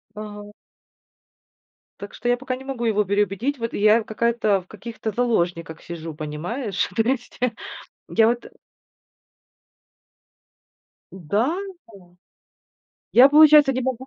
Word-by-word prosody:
Ага. 210 -1 -9 1.5
Так 200 0 -9
что 240 - -6
я 245 - +3
пока 260 0 -4
не 265 - -12
могу 250 -3 -4
его 210 -2 +2
переубедить. 205 +7 -1
Вот 230 -1 -4
и - - -3
я 215 +2 +4
какая-то, 220 -3 0
в 180 - -23
каких-то 220 +1 -7
заложниках 175 -8 -1
сижу, 165 -1 -8
понимаешь? 175 - -4
То 225 - +2
есть 245 +1 -3 0.7
я 225 -1 +3
вот 240 0 -2 2.7
Да, 205 - -1 0.3
о 180 -5 -18 1.0
я, 255 +3 +8
получается, 295 -2 +7
не 260 - -2
могу 260 0 -3
220 Hz, 120 wpm, -22 LUFS, 195-245 Hz, 2.7 s, я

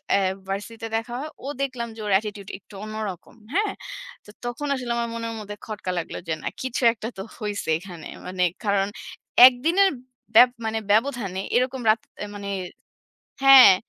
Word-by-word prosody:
আ - - +4 0.3
ভার্সিটিতে 220 +4 -4
দেখা 225 +2 -5
হয়, 300 +3 -5 0.2
ও - - -4
দেখলাম 255 -4 -2
যে - - -12
ওর 205 - -1
অ্যাটিটিউড 205 -1 -2
একটু 200 - -20
অন্যরকম। 215 -4 -6 0.2
হ্যাঁ? 410 +2 +2 0.5
তো - - -15 0.2
তখন 240 +5 -3
আসলে 250 -2 -4
আমার 235 0 -1
মনের 230 0 -4
মধ্যে 205 0 -7
খটকা 210 -4 -4
লাগলো 165 - -5
যে, 160 - 0
না - - -3
কিছু 260 0 -2
একটা 220 -1 -6
তো - - -4 0.2
হইছে 205 -5 -3
এখানে। 175 -3 -9 0.2
মানে 180 0 0 0.2
কারণ 200 -1 +2 0.6
একদিনের 330 +10 +3 0.5
ব্যব 245 +2 +9 0.2
মানে 220 0 0
ব্যবধানে 215 -5 +1
এরকম 255 +1 +1
রাগ 220 +1 +5 0.4
মানে 200 -1 -5 0.9
হ্যাঁ। 270 -6 +10
225 Hz, 160 wpm, -24 LUFS, 200-250 Hz, 0.9 s, হ্যাঁ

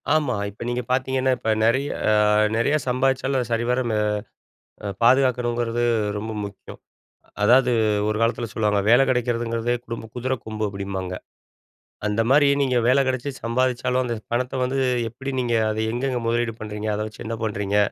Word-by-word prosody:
ஆமா, 145 -7 +1
இப்ப 105 - -15
நீங்க 125 +1 -1
பார்த்தீங்கன்னா, 130 0 +1
இப்ப 110 - -3 0.2
நிறைய 130 +5 +2 0.2
அ - - +4 0.5
நிறையா 145 +6 +2
சம்பாரிச்சாலும், 130 0 +1
சரிவர 120 +2 +1
மெ 110 - 0 1.1
பாதுகாக்கணுங்கிறது 120 -2 +2 0.3
ரொம்ப 110 +2 -4
முக்கியம்! 100 -1 -9 0.6
அதாவது 125 +3 +5 0.4
ஒரு 110 - 0
காலத்தில 115 0 +1
சொல்வாங்க, 105 -2 +1
வேலை 125 +3 +7
கிடைக்கிறதுங்கிறது 120 -1 0
குடும்ப 115 -1 -6
குதிர 130 +1 -1
கொம்பு 110 -1 -4
அப்டிம்பாங்க. 95 -2 -4 0.9
அந்த 105 +2 +1
மாரி 145 +1 +5
நீங்க 130 -3 +2
வேல 130 +2 +5
கிடைச்சி 130 +2 -1
சம்பாரிச்சாலும், 125 +1 0
அந்த 120 -1 -2 0.2
பணத்த 125 +2 -1
வந்து 130 +2 -1 0.3
எப்படி 130 +4 -7
நீங்க 120 -2 0 0.2
அத 110 - -2
எங்கெங்கே 125 +1 -1
முதலீடு 120 -1 0
பண்ணுறீங்க? 105 0 -5
அத 105 - -3
வச்சு 110 - -10
என்ன 115 +1 -3
பண்ணுறீங்க? 100 -1 -1
120 Hz, 145 wpm, -23 LUFS, 110-130 Hz, 1.1 s, வேலை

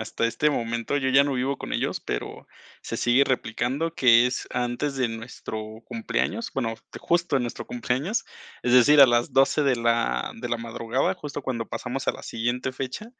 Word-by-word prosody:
hasta 110 +1 -3
este 150 +6 +2
momento, 115 +2 -2
yo 130 -1 0
ya 135 +2 +5
no 140 - -1
vivo 130 +1 -1
con - - -6
ellos, - - -1
pero - - -5 0.3
se - - -5
sigue 125 +3 +4
replicando, 130 +5 -1
que 120 -3 +6
es, 125 - -4
antes 125 +4 -1
de 130 -3 0
nuestro 110 -1 -7
cumpleaños, 230 0 -2
bueno, 115 -4 -1 0.3
justo 170 -3 +1
en 130 - +1
nuestro 120 - -5
cumpleaños, 135 - -2 0.4
es 120 - +1
decir, 140 +4 +7
a 140 - +11
las 120 -1 +1
12 135 +3 +4
de 135 -2 +3
la 115 - 0
de 120 - -4
la 120 - 0
madrugada, 115 +2 -1
justo 145 -1 -7
cuando 120 -4 -3
pasamos 130 +2 -4
a - - +2
la - - -11
siguiente 120 +3 -2
fecha, 130 - -5
125 Hz, 185 wpm, -25 LUFS, 115-140 Hz, 0.4 s, a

